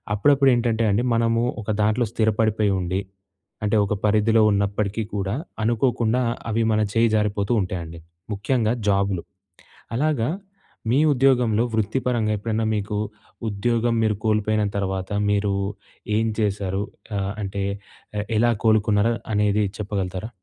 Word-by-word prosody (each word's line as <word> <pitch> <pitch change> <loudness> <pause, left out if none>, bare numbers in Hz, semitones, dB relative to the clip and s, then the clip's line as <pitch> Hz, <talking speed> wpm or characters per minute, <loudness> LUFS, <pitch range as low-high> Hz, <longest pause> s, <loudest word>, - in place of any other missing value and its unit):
అప్పుడప్పుడు 140 +5 +4
ఏంటంటే 115 -1 +1
అండి. 105 +5 +1
మనము 115 0 +2 0.2
ఒక 105 - -8
దాంట్లో 110 +3 +2
స్థిరపడిపోయి 110 -2 +2
ఉండి, 90 +1 -1 0.6
అంటే 105 +1 +1
ఒక 100 - -1
పరిధిలో 110 +2 +3
ఉన్నప్పటికీ 100 +2 0
కూడా 100 +1 -1 0.3
అనుకోకుండా 120 +1 +1 0.3
అవి 115 +1 +1
మన 110 0 +2
చేయి 115 0 +3
జారిపోతూ 105 0 0
ఉంటాయండి. 85 -3 -5 0.3
ముఖ్యంగా 110 +3 0 0.2
జాబ్‌లు. 100 -3 +1 0.7
అలాగా 135 -3 +1 0.6
మీ 130 - +4
ఉద్యోగంలో 125 -4 +3
వృత్తిపరంగా 110 +1 0
ఎప్పుడైనా 110 +2 -1
మీకు 105 0 -2 0.5
ఉద్యోగం 115 +3 0
మీరు 110 -1 +2
కోల్పోయిన 110 0 +2
తర్వాత, 95 -1 -2 0.2
మీరు 100 -1 +1 0.6
ఏం 110 - +2
చేశారు, 100 -2 -1 0.3
ఆహ్, 100 0 -2
అంటే 100 0 -3 0.8
ఎలా 120 +1 +4
కోలుకున్నారు 110 0 +3 0.2
అనేది 105 0 +2
చెప్పగలుగుతారా? 100 0 -3
105 Hz, 115 wpm, -23 LUFS, 100-115 Hz, 0.8 s, అప్పుడప్పుడు